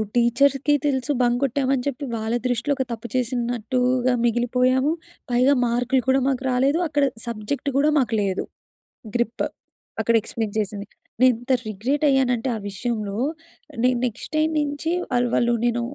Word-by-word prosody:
టీచర్స్‌కి 275 +4 +3
తెలుసు 275 0 0
బంక్ 245 0 +2
కొట్టాము 270 0 +1
అని 250 - -2
చెప్పి, 280 +1 -3
వాళ్ళ 220 0 -2
దృష్టిలో 245 +4 0
ఒక 265 - +1
తప్పు 230 0 -5
చేసినట్టుగా 250 +1 0
మిగిలిపోయాము. 250 +4 +2 0.4
పైగా 250 +3 +4
మార్కులు 245 +2 +1
కూడా 265 +1 +4
మాకు 265 -1 0
రాలేదు. 270 +6 +2
అక్కడ 290 -2 +1 0.2
సబ్జెక్ట్ 235 +5 -3
కూడా 295 +2 +4
మాకు 240 -4 0
లేదు. 195 -2 -1 0.7
గ్రిప్. 240 -1 0 0.6
అక్కడ 230 +2 +2
ఎక్స్‌ప్లెయిన్ 220 -1 -4
చేసింది. 205 -1 -3 0.3
నేను 255 -1 +7
ఇంత 255 +2 0
రిగ్రెట్ 240 +9 -1
అయ్యానంటే 260 -2 +2
ఆ - - -6
విషయంలో, 210 -1 -3 0.7
నేను 250 0 +3
నెక్స్ట్ 235 -4 -5
టైమ్ 310 +1 +2
నుంచి 290 +2 -2 0.2
వాళ్ళు, 245 0 +2
వాళ్ళు 240 0 +2
నేను 240 0 +1
250 Hz, 145 wpm, -23 LUFS, 235-270 Hz, 0.7 s, నేను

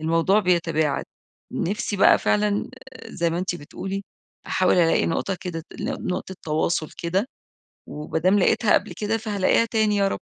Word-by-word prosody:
الموضوع 165 +6 +3
بيتباعد. 165 -5 +1 0.5
نفسي 200 +2 -2
بقى - - +6
فعلًا 210 -1 +1 0.2
آآ- - - -11
زي 170 -1 0
ما 170 - -2
أنتِ 180 -1 -2
بتقولي- 190 +5 -6 0.4
أحاول 185 - +2
ألاقي 170 -2 +3
نقطة 180 +3 -1
كده، 165 -3 -5 0.2
نقطة 200 -6 -3
تواصل 155 0 0
كده، 185 +6 0 0.6
وما 150 +2 -4
دام 185 +5 +3
لقيتها 220 +3 +3
قبل 205 - +1
كده 220 +1 -1
فهالاقيها 210 0 +1
تاني 220 -2 +1
يا 200 -1 +3
رب. - - -4
185 Hz, 150 wpm, -23 LUFS, 165-205 Hz, 0.6 s, بقى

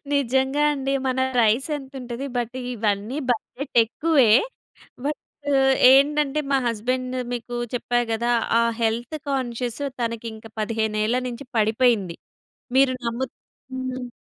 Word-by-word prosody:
నిజంగా 265 +1 +1
అండి. 275 -1 -2
మన 260 0 0 0.2
రైస్ 230 +6 +2
ఎంతుంటది. 265 -2 -7
బట్ 240 +1 -2 0.2
ఇవన్నీ 215 +1 -1
బడ్జెట్ 245 +4 -3
ఎక్కువే. 275 -1 +3 0.7
బట్ 295 +1 -1 0.7
ఏంటంటే 295 +1 +3
మా 275 - +4
హస్బెండ్ 255 +3 -1 0.2
మీకు 245 0 -5 0.2
చెప్పా 245 0 0
గదా! 235 +2 +1 0.3
ఆ - - +3 0.2
హెల్త్ 235 +6 -1
కాన్షియస్ 245 -1 -2 0.2
తనకింక 230 -1 -4
15ఏళ్ల 220 +2 0
నుంచి 245 +3 -7
పడిపోయింది. 220 -5 +2 0.6
మీరు 265 -1 +5
నమ్ము 235 +3 -1 0.5
హ్మ్. 255 -1 -4
245 Hz, 110 wpm, -23 LUFS, 230-270 Hz, 0.7 s, మీరు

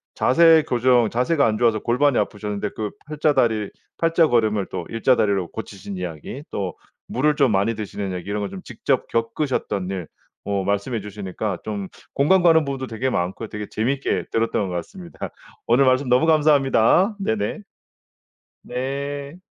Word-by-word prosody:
자세 160 +3 +5
교정 125 -2 +3
자세가 135 +5 +2
안 110 -1 +1
좋아서 115 -2 +2
골반이 125 +5 +2
아프셨는데 105 0 -2
그 105 -1 -3
팔자 150 0 +1
다리 110 -6 +1 0.3
팔자걸음을 120 - +2
또 - - -5
일자 115 +3 +3
다리로 100 -4 +1
고치신 100 -3 -7
이야기 90 - -6
또 95 -4 -3 0.3
물을 150 +4 +1
좀 140 -5 +3
많이 100 +3 +1
드시는 100 -2 -4
얘기 90 +2 -6
이런 105 0 -2
거 100 - -2
좀 190 - -8
직접 135 -2 -1
겪으셨던 115 -5 -1
일, 95 -4 -4 0.4
어 100 -1 -1
말씀해 100 +4 -1
주시니까 100 -1 -4
좀 100 -3 -4 0.2
공감 175 +6 +3
가는 165 -2 +6
부분도 135 -2 -4
되게 120 +4 -2
많고요. 95 +1 -2
되게 105 -1 -6
재밌게 130 +5 -1
들었던 115 -3 0
것 90 - -4
같습니다. 170 - -7 0.4
오늘 120 +4 +5
말씀 130 +1 +3
너무 125 +5 +4
감사합니다. 155 - +4
네네. 220 +2 -1 1.1
네. 140 +4 -4
120 Hz, 340 characters per minute, -22 LUFS, 105-140 Hz, 1.1 s, 가는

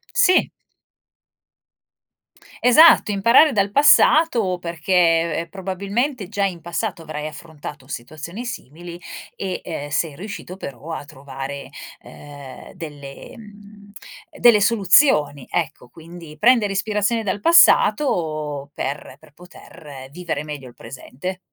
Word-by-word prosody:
Sì. 390 -7 +4 2.2
Esatto 250 -3 +6
imparare 235 +10 +5
dal 200 -4 0
passato 280 - +4
perché 170 -1 0
probabilmente 200 +5 -3
già 200 -1 -1
in 175 -4 -4
passato 175 +2 -4
avrai 155 -1 -6
affrontato 150 -3 -10
situazioni 155 - -8
simili 170 - -8 0.4
e, 190 -2 -4
ehm, 145 +1 -6
sei 155 0 -2
riuscito 195 0 -8
però 145 -3 -9
a - - -6
trovare, 140 -1 -8 0.4
uhm, 140 -2 -12
delle 145 -5 -10
uhm, 205 -2 -15 0.5
delle 225 -4 +5
soluzioni, 195 - +3
ecco, 150 -7 -3
quindi 165 0 -13
prendere 230 -3 +3
ispirazione 210 +3 -1
dal 200 0 -3
passato 160 - +3
per 135 -1 -6
per 155 -1 -21
poter 145 -5 -13
vivere 165 -3 -5
meglio 145 -4 -8
il 120 - -17
presente. 145 +7 -8
175 Hz, 110 wpm, -20 LUFS, 150-205 Hz, 2.2 s, Esatto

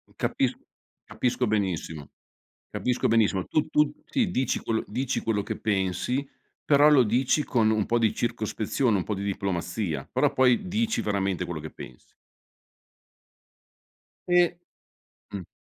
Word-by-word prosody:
capis - - 0 0.5
capisco 125 -1 -1
benissimo. 90 -8 -2 0.6
Capisco 125 -1 0
benissimo. 105 -5 +2
Tu 155 0 0
tu 150 -1 +2
ti 240 -9 0
dici 130 -3 0
quello 110 -1 -1
dici 130 0 -2
quello 105 -3 0
che - - -5
pensi, 105 +7 -1 0.4
però 145 0 +6
lo 140 -4 +6
dici 125 +6 +1
con 115 -5 +2
un 110 -2 +1
po' 120 0 +1
di 110 -2 +2
circospezione, 115 0 -1
un 90 - -1
po' 105 - -3
di 100 - -4
diplomazia. 95 -2 -3
Però - - +2
poi 130 +7 +3
dici 220 +4 0
veramente 95 -3 -1
quello 85 -3 -5
che 80 - -8
pensi. 60 - -13 2.1
E 175 -1 +3 0.8
mh. 95 -4 -6
110 Hz, 135 wpm, -26 LUFS, 100-135 Hz, 2.1 s, però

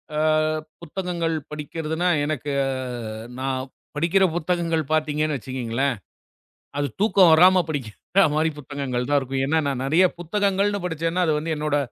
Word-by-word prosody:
ஆ, - - -1 0.6
புத்தகங்கள் 170 -1 -2 0.2
படிக்கிறதுன்னா, 160 +3 -2 0.2
எனக்கு 145 -1 -3 0.2
அ, - - -1 0.7
நான் 130 0 -1 0.3
படிக்கிற 170 +6 +2
புத்தகங்கள் 170 -1 0
பாத்தீங்கன்னு 155 -1 +1
வச்சுக்கோங்களேன். 130 +1 -2 0.8
அது 145 0 0
தூக்கம் 200 -4 +5
வராம 180 +3 +7
படிக்கிற 145 - -1
மாதிரி 155 +1 +2
புத்தகங்கள்தான் 140 -1 -1
இருக்கும். 135 0 -2
ஏன்னா, 160 +4 +2
நான் 135 -2 -2
நிறைய 160 +7 +4
புத்தகங்கள்னு 200 +3 0
படிச்சேன்னா, 165 +1 -1
அது 155 +1 0
என்னோட 150 -1 0
155 Hz, 120 wpm, -23 LUFS, 140-175 Hz, 0.8 s, வராம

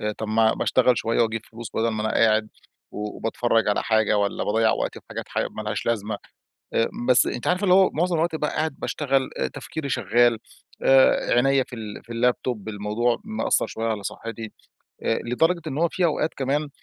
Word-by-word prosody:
آآ 105 0 -1
طب 110 - -4
ما 110 0 +3
ما - - -3
اشتغل 125 -2 +3
شوية 115 +1 +1
وأجيب 115 0 -1
فلوس 115 0 -8
بَدَل 115 +1 +1
ما 110 -1 -2
أنا 110 - -1
قاعد، 110 -1 +3 0.4
وباتفرّج 115 +1 -1
على 105 - +1
حاجة 110 -1 +2
والّا 100 0 -1
باضيّع 110 +1 +2
وقتي - - -3
في - - -45
حاجات - - -5
حا - - -1
مالهاش 110 0 -4
لازمة. 105 -2 -1 0.6
آآ 115 - +2 0.2
بس 125 - +6
أنتِ 120 - -4
عارفة 180 +2 +1
اللي 185 -2 +4
هو 190 -1 +6
معظم 175 +3 +1
الوقت 160 0 0
بقى 150 -1 -1
قاعد 155 -3 -2
باشتغل، 135 -3 0
أ 65 - 0
تفكيري 140 - -6
شغّال، 120 0 +3 0.5
آآ 135 0 +5
عينيا 135 +2 +3
في 125 - -9
ال 110 -3 -8
في 120 - -13
اللاب 125 +1 +2
توب، 110 -4 -3
الموضوع 105 +3 0
مأثّر 220 0 0
شويّة 115 0 -3
على 110 -3 -2
صحّتي. 115 +1 -6 0.5
آآ 115 - +1
لدرجة 165 +9 +1
إن 140 -2 -4
هو 170 +2 +3
في 180 - 0
أوقات 160 0 0
كمان 140 +3 -1
115 Hz, 200 wpm, -24 LUFS, 110-135 Hz, 0.6 s, بس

